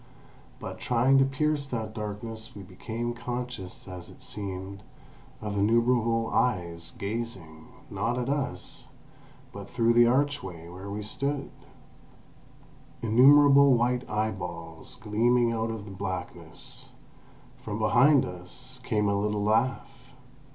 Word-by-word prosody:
But -, -, -7 dB
trying 130 Hz, +3 st, +3 dB
to 135 Hz, -, +5 dB
pierce 145 Hz, +1 st, 0 dB
that 110 Hz, -4 st, -4 dB
darkness 110 Hz, +1 st, -6 dB
we 100 Hz, -, -8 dB
became 115 Hz, +6 st, -4 dB
conscious, 120 Hz, -6 st, -5 dB
as 90 Hz, -2 st, -8 dB
it -, -, -15 dB
seemed, 100 Hz, -1 st, -5 dB, 0.6 s
of 105 Hz, -1 st, -3 dB
innumerable 115 Hz, +1 st, +2 dB
eyes 85 Hz, -8 st, 0 dB
gazing, 100 Hz, -8 st, -5 dB, 0.2 s
not 115 Hz, +5 st, -2 dB
at 125 Hz, -1 st, -2 dB
us, 140 Hz, -1 st, -3 dB, 0.7 s
but 100 Hz, 0 st, -8 dB
through 120 Hz, -1 st, +2 dB
the 120 Hz, 0 st, +6 dB
archway 125 Hz, -, 0 dB
where 95 Hz, +3 st, -8 dB
we 105 Hz, +1 st, -4 dB
stood; 140 Hz, +6 st, -2 dB, 1.5 s
innumerable 140 Hz, +4 st, +7 dB
white 125 Hz, +1 st, 0 dB
eyeballs 90 Hz, -7 st, -4 dB
gleaming 120 Hz, +2 st, +2 dB
out 115 Hz, 0 st, -1 dB
of 105 Hz, -3 st, -7 dB
blackness. 90 Hz, -3 st, -6 dB, 0.7 s
From -, -, -4 dB
behind 145 Hz, -1 st, +5 dB
us 90 Hz, +8 st, -8 dB
came 105 Hz, -4 st, +1 dB
a 100 Hz, -, +2 dB
little 105 Hz, 0 st, 0 dB
laugh. 125 Hz, +4 st, -1 dB
115 Hz, 115 wpm, -28 LUFS, 100-125 Hz, 1.5 s, innumerable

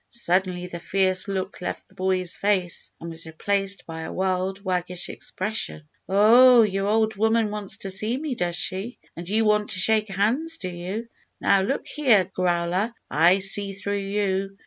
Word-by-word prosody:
Suddenly 180 Hz, -4 st, 0 dB
the 175 Hz, -1 st, -7 dB
fierce 185 Hz, +1 st, +1 dB
look 190 Hz, -1 st, -4 dB
left -, -, -5 dB
the -, -, -25 dB
boy's 185 Hz, -1 st, -1 dB
face, 190 Hz, -4 st, -1 dB
and 165 Hz, 0 st, -7 dB
was 165 Hz, 0 st, -6 dB
replaced 195 Hz, +4 st, -2 dB
by 160 Hz, -1 st, -7 dB
a 160 Hz, -, -6 dB
wild, 190 Hz, +1 st, -1 dB
waggish 180 Hz, -2 st, -2 dB
expression. 210 Hz, -5 st, -3 dB, 0.3 s
"Oh! 230 Hz, +5 st, +7 dB
your 195 Hz, -1 st, -1 dB
old 220 Hz, 0 st, +2 dB
woman 220 Hz, 0 st, +2 dB
wants 210 Hz, -2 st, -4 dB
to 195 Hz, -, -5 dB
see 215 Hz, +6 st, 0 dB
me, 295 Hz, -1 st, -3 dB
does 175 Hz, -7 st, -2 dB
she? 190 Hz, +7 st, -3 dB, 0.2 s
And 170 Hz, +1 st, -8 dB
you 220 Hz, +2 st, +2 dB
want 210 Hz, 0 st, +2 dB
to 185 Hz, -, 0 dB
shake 215 Hz, +2 st, +3 dB
hands, 235 Hz, -, 0 dB
do 185 Hz, -, -5 dB
you? 185 Hz, +6 st, -5 dB, 0.3 s
Now 195 Hz, -, +3 dB
look 265 Hz, +9 st, -2 dB
here, 245 Hz, -11 st, +3 dB
Growler; 180 Hz, +4 st, -1 dB, 0.2 s
I 170 Hz, +5 st, +5 dB
see 195 Hz, +1 st, +1 dB
through 200 Hz, +1 st, -3 dB
you! 195 Hz, -1 st, -2 dB
195 Hz, 170 wpm, -24 LUFS, 180-215 Hz, 0.3 s, Oh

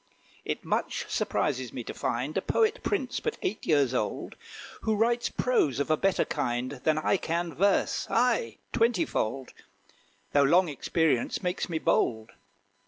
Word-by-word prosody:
It -, -, -3 dB
much -, -, -1 dB
surprises 130 Hz, -4 st, -1 dB
me 125 Hz, -, -5 dB
to -, -, -6 dB
find 125 Hz, +6 st, -2 dB
A 195 Hz, -, +1 dB
poet 445 Hz, -, +1 dB
prince, -, -, -1 dB
but 460 Hz, -, -3 dB
eight 205 Hz, -, -3 dB
years 140 Hz, -5 st, +3 dB
old, 110 Hz, -4 st, -2 dB, 0.5 s
Who 220 Hz, -, +1 dB
writes 235 Hz, +3 st, +1 dB
prose 155 Hz, -, +1 dB
of 145 Hz, -, 0 dB
a -, -, +5 dB
better 195 Hz, +4 st, +1 dB
kind 125 Hz, -4 st, -2 dB
Than 155 Hz, -1 st, +2 dB
I 155 Hz, +5 st, +2 dB
can 170 Hz, -1 st, -2 dB
verse 195 Hz, +7 st, +1 dB
aye, 230 Hz, -, +1 dB, 0.2 s
twenty 235 Hz, +8 st, +2 dB
fold 130 Hz, -, -3 dB, 0.8 s
Though 145 Hz, -, +5 dB
long 170 Hz, +5 st, +4 dB
experience 150 Hz, +1 st, 0 dB
makes 180 Hz, 0 st, -2 dB
me 165 Hz, -, -1 dB
bold. 110 Hz, -7 st, +1 dB
155 Hz, 155 wpm, -28 LUFS, 130-200 Hz, 0.8 s, a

